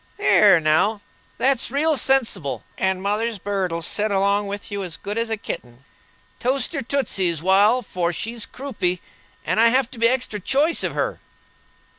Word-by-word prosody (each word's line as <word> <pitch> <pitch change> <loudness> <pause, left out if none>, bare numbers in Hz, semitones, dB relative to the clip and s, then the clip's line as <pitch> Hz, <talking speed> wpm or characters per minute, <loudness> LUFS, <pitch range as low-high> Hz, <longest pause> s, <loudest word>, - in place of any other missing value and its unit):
"There 210 - +5
now, 170 +8 +2 0.4
that's 265 -2 +1
real 300 +4 +1
sensible; 235 - 0
and 190 0 -1
mother's 215 +2 -1
bird'll 185 -4 -2
set 210 +5 -1
along 200 +1 +1
with 200 +1 -6
you 200 0 -3
as 175 -3 -6
good 205 - -6
as 230 0 -1
a 225 - -1
kitten. 125 - -8 0.5
Toast 260 +4 +1
her 280 - -2
tootsies 195 - 0
wal, 205 +7 +4
for 175 -4 -2
she's 225 +5 -4
croupy, 210 -10 -3 0.5
and - - 0
I 230 - +7
have 255 +1 +2
to 240 - -10
be 230 - +5
extra 250 -4 -1
choice 285 - +1
of - - -2
her." - - -2
210 Hz, 165 wpm, -22 LUFS, 190-250 Hz, 0.5 s, I